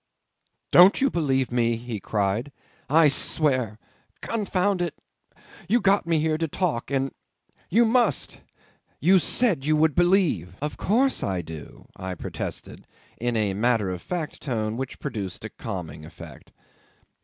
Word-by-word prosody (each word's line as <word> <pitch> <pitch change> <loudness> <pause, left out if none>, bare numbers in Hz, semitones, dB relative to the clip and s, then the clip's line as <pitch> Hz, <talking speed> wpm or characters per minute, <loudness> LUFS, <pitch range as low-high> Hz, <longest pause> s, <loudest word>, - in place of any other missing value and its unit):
"Don't 180 +3 +7
you 275 0 +2
believe 135 -6 0
me?" 120 -1 +2
he 115 -2 -6
cried. 105 +7 -1 0.4
"I 155 +2 +6
swear!... 130 -6 +1 0.5
Confound 200 -3 0
it! 170 -4 -2 0.7
You 235 +4 +4
got 200 -4 +2
me 165 -1 +2
here 155 0 0
to 165 - 0
talk, 155 -6 -2
and... 135 -1 0 0.6
You 230 +6 +4
must!... 240 +1 +1 0.6
You 190 +2 +5
said 190 - +1
you 155 +2 +2
would 155 0 +3
believe." 175 - +2
"Of 150 +1 -3
course 255 +7 +1
I 95 -3 -2
do," 80 -2 -10
I 95 -1 -5
protested, - - -6 0.3
in 120 0 -1
a 105 -3 0
matter 110 -2 +1
of 90 -1 -5
fact 170 -4 -5
tone 110 -5 -2
which 130 +1 -5
produced 100 -3 -5
a - - -5
calming 85 -8 -6
effect. 85 -3 -12
135 Hz, 145 wpm, -25 LUFS, 105-175 Hz, 0.7 s, Don't